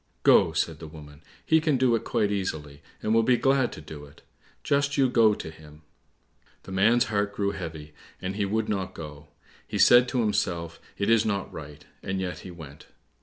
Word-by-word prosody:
"Go," - - +5
said - - -1
the 80 - -8
woman, 75 -1 -13 0.2
"he 160 0 +4
can 155 -4 +1
do 125 -2 +3
it 115 - 0
quite 105 -1 0
easily, 75 -8 -4 0.2
and 110 - +1
will 115 - +5
be 125 +2 +3
glad 135 -1 +2
to - - -9
do 75 -1 -10
it; 70 - -19 0.4
just 140 +1 +1
you 135 -2 +4
go 115 -4 +4
to 80 - -7
him." 75 -1 -16 0.8
The - - -10
man's 110 +6 +4
heart 100 -1 -2
grew 100 -1 0
heavy, 80 -5 -7 0.3
and 95 +1 -4
he 105 - -1
would 105 +2 -1
not 95 -3 -3
go. 75 -2 -9 0.4
He - - -4
said 120 +1 +6
to 125 -1 0
himself, 85 -6 -1 0.2
"It 100 +2 +1
is 115 -1 +5
not 100 -3 -2
right," 75 -1 -10 0.2
and 95 0 -3
yet 90 -1 -4
he - - -10
went. 75 -5 -12
100 Hz, 200 wpm, -26 LUFS, 80-115 Hz, 0.8 s, said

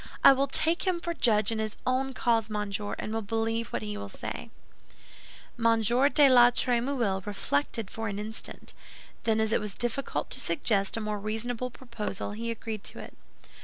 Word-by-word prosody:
I - - +10
will 275 +1 +1
take 320 +6 +1
him 360 -2 +2
for 340 0 -3
judge 215 -8 +3
in 225 - -2
his 215 -1 -3
own 260 +1 0
cause, 225 -2 +1
monsieur, 210 -1 -2
and 215 - -4
will 225 - -1
believe 225 +2 -1
what 115 - -4
he 105 -1 -4
will 100 0 -6
say." - - -6 1.1
M. 230 -1 +4
de 270 +6 +5
la 245 -2 +8
Trémouille 240 -5 0
reflected 200 +1 -1
for 225 0 -4
an 200 -1 -3
instant; 215 +2 -5 0.5
then 220 -1 +2
as 220 0 +1
it - - +3
was 210 -1 -5
difficult 240 +3 -2
to - - +1
suggest 205 -9 +1
a - - -2
more 210 -1 -2
reasonable 225 +4 -3
proposal, 235 -6 -5
he 230 +3 -4
agreed 220 -2 -5
to - - -6
it. - - -9
225 Hz, 180 wpm, -28 LUFS, 210-245 Hz, 1.1 s, I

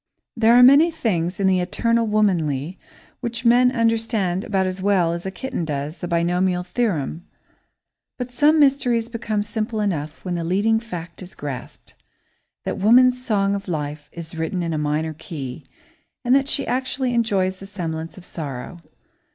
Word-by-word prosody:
There 230 0 +5
are 250 - +8
many 280 +6 +7
things 185 - -1
in 195 - +1
the 190 -1 +3
"eternal 230 +5 +1
womanly" 175 -7 0 0.4
which 235 0 -5
men 245 +2 +5
understand 225 -6 0
about 190 -2 0
as 185 0 -3
well 185 -4 +2
as 170 +2 -5
a - - -1
kitten 190 0 -4
does 150 +1 -4
the 175 - -4
binomial 180 +1 +1
theorem, 180 - -2 0.9
but 250 -1 -5
some 295 +5 +4
mysteries 250 -5 +3
become 220 -3 -2
simple 215 +1 -3
enough 160 -7 -3
when 180 - -2
the 170 -1 -2
leading 205 +6 +2
fact 175 -7 -8
is 185 0 -11
grasped 140 -4 -8 0.7
that - - -3
woman's 250 +4 +5
song 200 -4 +1
of 200 0 -4
life 150 -3 -4
is 170 -1 -9
written 165 +3 -2
in 165 -1 -2
a - - -1
minor 150 +2 -1
key 145 -3 -7 0.6
and 250 +2 +4
that 275 0 +2
she 280 -1 0
actually 260 0 -1
enjoys 195 -5 +1
the 195 - -9
semblance 165 -5 -5
of 180 - -11
sorrow. 145 +1 -6
190 Hz, 165 wpm, -22 LUFS, 170-230 Hz, 0.9 s, are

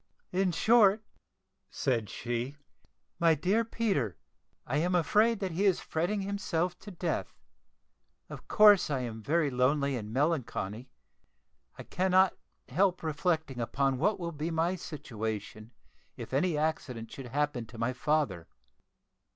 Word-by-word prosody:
"In 185 0 +1
short," 215 +2 +4 0.7
said 115 -7 -1
she, 120 +4 -4 0.6
"my 165 -2 +5
dear 190 +10 +1
Peter, 200 - -1 0.5
I 135 - -1
am 175 +4 +1
afraid 210 +7 +3
that 190 -2 -2
he 185 +5 0
is 190 -3 +3
fretting 180 +6 -1
himself 185 -3 -1
to 205 - -10
death. 175 -3 -3 0.9
Of - - -10
course 210 -5 +6
I 135 -3 -1
am 115 -3 -5
very 150 +4 +1
lonely 140 +2 +1
and 105 -3 -5
melancholy. 130 - -1 0.9
I - - -7
cannot 185 0 +3 0.3
help 185 -2 +1
reflecting 160 -3 -1
upon 135 +2 0
what 205 +7 +1
will 170 -1 -3
be 155 +1 -4
my 165 +2 0
situation 110 - -6 0.5
if - - -8
any 155 +3 +1
accident 135 -7 -2
should 135 -2 -8
happen 135 -3 -1
to 115 - -12
my 115 +3 -1
father. 125 - 0
155 Hz, 135 wpm, -30 LUFS, 125-185 Hz, 0.9 s, course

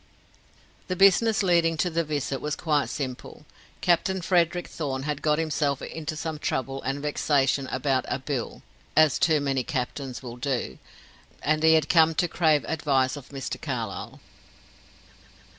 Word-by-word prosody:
The 185 - -2
business 200 +3 +4
leading 170 -3 +3
to 180 +3 0
the 165 +1 0
visit 145 -3 -3
was 150 0 -2
quite 150 -4 0
simple. 130 -4 -6 0.4
Captain 185 +2 +2
Frederick 175 -1 +1
Thorn 135 -4 -4
had 150 0 -3
got 150 -1 +2
himself 150 -3 0
into 155 -1 -5
some 155 0 -4
trouble 135 -1 -2
and 140 +2 -3
vexation 140 -2 +1
about 135 -2 0
"a - - -1
bill" 130 -2 -4 0.3
as 155 -2 +5
too 155 -3 +3
many 135 -2 0
captains 130 0 -4
will 120 -1 -7
do 120 - -3 0.6
and 155 +1 +1
he 160 0 +6
had 155 -2 +2
come 160 -1 +4
to 175 - +2
crave 155 -3 +2
advice 140 -4 +1
of 140 -2 -11
Mr. 135 -2 -5
Carlyle. - - -5
150 Hz, 150 wpm, -26 LUFS, 135-160 Hz, 0.6 s, he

